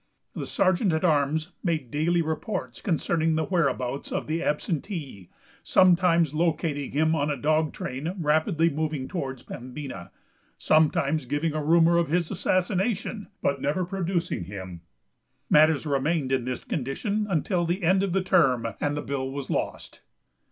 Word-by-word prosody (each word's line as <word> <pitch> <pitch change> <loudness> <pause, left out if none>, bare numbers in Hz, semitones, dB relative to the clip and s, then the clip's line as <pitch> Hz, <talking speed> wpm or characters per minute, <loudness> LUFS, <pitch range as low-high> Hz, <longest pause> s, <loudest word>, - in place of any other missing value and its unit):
The - - -5
sergeant 185 0 +2
at 160 +3 0
arms 155 +1 +1
made 155 -9 -1
daily 170 +3 +1
reports 170 +5 -4
concerning 165 -3 +1
the 160 0 0
whereabouts 140 -7 -1
of - - -2
the 160 +2 -2
absentee, 150 - -3 0.3
sometimes 175 -4 +4
locating 155 -3 0
him 160 +2 +2
on 145 -2 0
a 145 - -1
dog 155 +1 +1
train, 150 +8 -5
rapidly 160 +1 +2
moving 150 -2 -2
towards 135 -7 -5
Pembina, 130 -6 -8 0.5
sometimes 155 -2 +2
giving 145 +4 -1
a 155 -1 -2
rumor 165 +2 +4
of 170 - 0
his 170 0 0
assassination, 195 +3 -1 0.2
but 140 -1 0
never 165 +6 0
producing 175 - -2
him. 95 -2 -8 0.7
Matters 155 0 +5
remained 145 0 0
in 130 -3 +1
this 125 0 -4
condition 200 - -2
until 175 0 0
the 175 +3 -1
end 185 +3 +4
of 195 -2 0
the 195 -1 +1
term, 135 -11 +3 0.2
and 145 0 0
the 150 - -3
bill 135 -1 -3
was 135 0 -5
lost. - - -4
160 Hz, 150 wpm, -26 LUFS, 140-175 Hz, 0.7 s, Matters